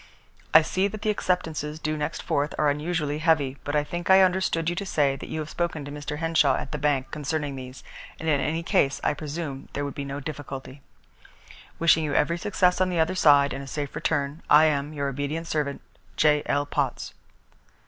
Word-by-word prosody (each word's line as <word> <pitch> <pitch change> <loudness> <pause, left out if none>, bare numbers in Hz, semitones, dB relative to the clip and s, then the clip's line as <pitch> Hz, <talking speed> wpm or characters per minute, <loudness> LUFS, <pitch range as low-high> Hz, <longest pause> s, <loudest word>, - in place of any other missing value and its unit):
"I - - +8
see 185 +5 0
that 210 +1 -7
the 215 - +2
acceptances 160 -6 -2
due 155 0 -2
next 150 -1 -4
4th 145 +1 0
are 150 -1 +3
unusually 150 0 -2
heavy, 155 -5 +2
but 145 - -3
I 150 - +3
think 175 +4 -5
I 190 0 +8
understood 180 -3 +1
you 175 - 0
to - - -2
say 145 -7 +1
that - - -9
you 160 - -3
had 155 - -6
spoken 160 -4 -3
to 145 - -7
Mr. 150 +1 -5
Henshaw 160 -4 +3
at - - -5
the 150 - -3
bank 140 -2 0
concerning 150 -1 -3
these, 130 0 -9 0.4
and 160 - -5
in 145 -3 +2
any 165 +2 -1
case 140 -4 +2
I - - +2
presume 145 -2 -6
there 145 - -2
would 140 - -5
be 140 - -5
no 140 0 -5
difficulty. 135 -2 -7 1.0
"Wishing 165 -1 +4
you 145 -2 -2
every 170 +3 +2
success 180 -1 +2
on 185 - +3
the 175 -2 -1
other 160 +3 +2
side, 145 -5 +5
and 135 - -5
a - - -10
safe 145 0 -4
return, 145 0 -1
"I 150 +2 +7
am, 145 -1 0
"Your 140 -2 -2
obedient 145 +4 -3
servant, 150 -4 -2 0.4
"J.L. 150 -1 +2
POTTS." - - -2
150 Hz, 205 wpm, -25 LUFS, 140-165 Hz, 1.0 s, I